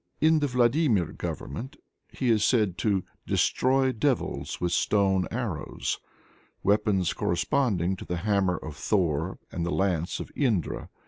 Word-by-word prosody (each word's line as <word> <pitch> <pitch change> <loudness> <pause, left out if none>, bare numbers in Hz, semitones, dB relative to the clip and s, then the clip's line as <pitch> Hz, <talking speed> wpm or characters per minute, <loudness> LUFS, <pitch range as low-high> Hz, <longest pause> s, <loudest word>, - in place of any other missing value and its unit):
In 160 0 +4
the 145 - +1
Vladimir 125 - +2
Government 120 - -5 0.3
he 125 -3 0
is 110 -2 +3
said 105 -5 +2
"to 100 -4 +1 0.2
destroy 130 +1 +2
devils 130 +2 -1
with 90 -1 -1
stone 95 0 +2
arrows," 110 -10 -3 0.6
weapons 100 -3 +2
corresponding 95 - 0
to - - -8
the 90 - -3
hammer 95 -1 +1
of 75 -2 -8
Thor 85 -1 0
and 85 - -3
the 85 - -1
lance 90 -3 0
of - - -7
Indra. 115 - 0
100 Hz, 135 wpm, -27 LUFS, 90-125 Hz, 0.6 s, In